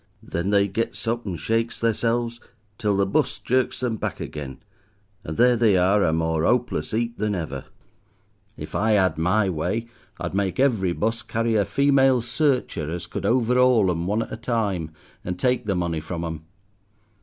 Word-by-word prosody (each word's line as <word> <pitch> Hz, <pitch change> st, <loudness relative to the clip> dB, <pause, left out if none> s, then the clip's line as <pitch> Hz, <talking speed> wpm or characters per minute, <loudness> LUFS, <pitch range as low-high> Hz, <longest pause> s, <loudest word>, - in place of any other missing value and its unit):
Then 85 Hz, +3 st, -3 dB
they 100 Hz, -1 st, +3 dB
gets 115 Hz, +4 st, -3 dB
up 120 Hz, -1 st, -1 dB
and 90 Hz, -4 st, -4 dB
shakes 115 Hz, +7 st, -1 dB
theirselves 115 Hz, +1 st, 0 dB, 0.4 s
till 105 Hz, -2 st, +1 dB
the 100 Hz, -, +3 dB
bus 95 Hz, -, 0 dB
jerks 130 Hz, +1 st, 0 dB
them 120 Hz, -3 st, -1 dB
back -, -, -4 dB
again, 70 Hz, -3 st, -6 dB, 0.7 s
and 80 Hz, -, -6 dB
there 125 Hz, 0 st, +5 dB
they 110 Hz, -5 st, +4 dB
are, 95 Hz, +3 st, +3 dB
a -, -, +3 dB
more 80 Hz, 0 st, 0 dB
'opeless 120 Hz, +6 st, 0 dB
'eap 115 Hz, +1 st, -1 dB
than 105 Hz, -1 st, 0 dB
ever. 70 Hz, -7 st, -5 dB, 0.9 s
If -, -, -8 dB
I 110 Hz, +1 st, +2 dB
'ad 95 Hz, -6 st, +2 dB
my 95 Hz, +5 st, +2 dB
way 105 Hz, +7 st, -2 dB, 0.3 s
I'd -, -, -4 dB
make 95 Hz, +1 st, -1 dB
every 110 Hz, -10 st, +2 dB
bus 115 Hz, +5 st, -1 dB
carry 115 Hz, +1 st, -1 dB
a 100 Hz, -2 st, +3 dB
female 135 Hz, +2 st, +3 dB
searcher 125 Hz, -, 0 dB
as 85 Hz, +2 st, -4 dB
could -, -, -4 dB
over'aul 125 Hz, -4 st, +4 dB
'em 85 Hz, 0 st, -2 dB
one 105 Hz, +3 st, +1 dB
at -, -, -11 dB
a -, -, -4 dB
time, 105 Hz, -9 st, -1 dB, 0.3 s
and 90 Hz, 0 st, -4 dB
take 125 Hz, +2 st, 0 dB
the 100 Hz, -, +1 dB
money 85 Hz, -2 st, -1 dB
from 85 Hz, +2 st, -5 dB
'em. 80 Hz, -1 st, -6 dB
105 Hz, 180 wpm, -24 LUFS, 90-120 Hz, 0.9 s, there